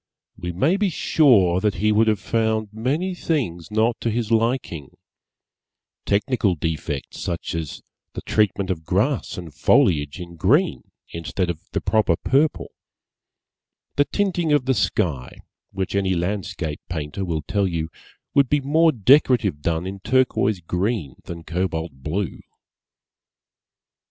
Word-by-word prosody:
We 90 0 -5
may 140 - +2
be 205 -1 +1
sure 110 - +4
that 105 +1 0
he 105 +4 +1
would 110 +1 +3
have 105 -2 +2
found 110 0 -1
many 145 - -1
things 125 - -2
not 110 +2 +1
to 115 - 0
his 115 -1 -2
liking; 115 - -1 1.1
technical 105 -2 +1
defects 75 -3 -4
such 85 -1 -3
as 80 -3 -5 0.3
the - - -6
treatment 100 -3 +1
of 80 -3 -4
grass 105 - 0
and 85 -4 -8
foliage 75 +1 +2
in 85 -1 -9
green 145 - +2 0.2
instead 85 +3 -2
of 80 - -9
the - - 0
proper 105 -6 +2
purple; 140 - +1 1.2
the 145 - +3
tinting 180 -5 0
of 145 -4 +3
the 130 - +3
sky 70 - -1 0.3
which 95 -1 -3
any 95 -2 +1
landscape 90 -3 -3
painter 80 +2 -4
will 80 -4 -2
tell 100 +6 0
you 85 -2 -3 0.4
would 140 -3 +4
be 145 - +3
more 160 +4 +3
decorative 120 - +3
done 80 +2 -1
in 95 +1 -5
turquoise 110 -3 +1
green 90 - -2
than 85 -1 -7
cobalt 85 -1 -2
blue. 75 +8 -4
100 Hz, 135 wpm, -22 LUFS, 85-125 Hz, 1.2 s, sure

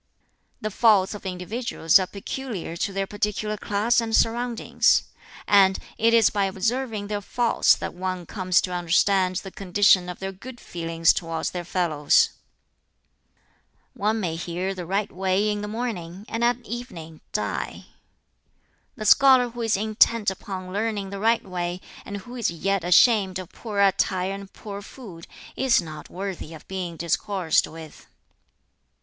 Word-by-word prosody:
"The 215 - -3
faults 210 -3 +4
of 205 -2 -7
individuals 185 -1 +1
are 185 - -2
peculiar 200 -3 -6
to 200 +4 -2
their 195 0 -1
particular 210 +1 -2
class 210 +3 +1
and 225 -1 -1
surroundings; 235 +1 +2 0.4
and 195 -2 +5 0.2
it 230 +1 +4
is 230 -2 +5
by 200 -1 +1
observing 220 +3 -2
their 205 0 -3
faults 235 +3 +3
that - - -5
one 185 0 -4
comes 185 -2 +1
to 180 - -4
understand 185 +2 +2
the 195 +1 -5
condition 190 -1 +3
of 180 - -6
their 195 0 -5
good 240 +6 -11
feelings 165 -1 +1
towards 165 -2 -3
their 175 -1 -4
fellows. 165 -5 +2 1.6
"One 215 +2 0
may 175 -6 -2
hear 180 +3 -3
the 180 -3 -7
right 200 +3 -1
way 190 +3 +1
in 205 0 -3
the 210 - -4
morning, 210 -5 -5
and 230 +1 -3
at 240 0 +3
evening 175 -10 -8
die. - - -3 1.1
"The 215 - -6
scholar 260 +1 +6
who 240 0 -7
is 225 -3 +1
intent 215 0 +3
upon 185 -1 -7
learning 205 -2 -2
the 200 - -5
right 225 +2 +2
way, 180 -1 -3 0.3
and 205 - -5
who 240 +6 -10
is 235 -4 0
yet 190 +2 -1
ashamed 190 +1 +4
of 185 -2 -8
poor 210 -4 -5
attire 190 -1 +2
and 200 0 -9
poor 200 -2 -8
food, 195 -7 -11 0.3
is 265 -3 +3
not 155 -3 -8
worthy 185 -4 -6
of 155 - -14
being 180 -3 -5
discoursed 170 +1 +1
with. 160 -1 -12
195 Hz, 155 wpm, -24 LUFS, 180-220 Hz, 1.6 s, scholar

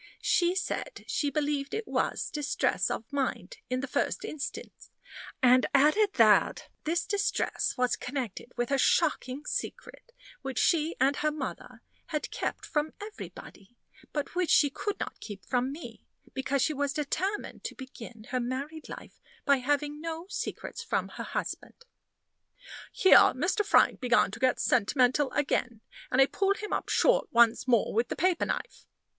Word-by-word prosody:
She 350 0 +3
said 400 +5 -3
she 290 - 0
believed 290 -1 -1
it 440 +1 -4
was - - -1
distress 295 -1 0
of 230 +5 -5
mind 280 - -2
in 255 0 -1
the 280 - -4
first - - -1
instance; 305 -3 -7 0.5
and 255 0 +6
added 310 +9 +4
that - - +4 0.2
this 340 +2 0
distress 405 -1 0
was 250 0 +2
connected 250 -3 -5
with 240 +2 -1
a 275 - +2
shocking 295 -3 +1
secret, - - -5 0.3
which 265 -1 -5
she 325 -1 +2
and 275 +2 +3
her 305 - +1
mother 295 -4 -6 0.2
had 300 -2 -3
kept - - -3
from 300 0 -1
everybody, 240 - -10 0.3
but 295 -2 -3
which 355 -1 0
she 285 -2 +5
could 410 +7 -4
not - - -5
keep 200 -4 -9
from 250 +1 0
me, 310 +4 -10 0.3
because 265 0 0
she 310 - +1
was 285 -1 -1
determined 370 +8 -3
to - - -4
begin 240 -4 -10
her 255 - 0
married 275 +6 -4
life - - -10 0.2
by 280 -1 +5
having 290 +3 -1
no 330 +1 -5
secrets - - -5
from - - -1
her - - -7
husband." 470 - -5 1.1
Here 380 - +7 0.2
Mr. 350 - +1
Frank 410 - +4
began 250 -5 +3
to 225 - -8
get 260 -1 +2
sentimental 255 +4 +2
again, 240 -5 -1 0.3
and 250 - +1
I 270 - +8
pulled 395 +7 0
him 425 - -5
up - - -2
short - - +3
once 235 +1 +4
more 235 -4 +3
with 230 +2 +1
the - - -4
paper 360 -1 +1
knife. - - -5
285 Hz, 160 wpm, -29 LUFS, 255-330 Hz, 1.1 s, I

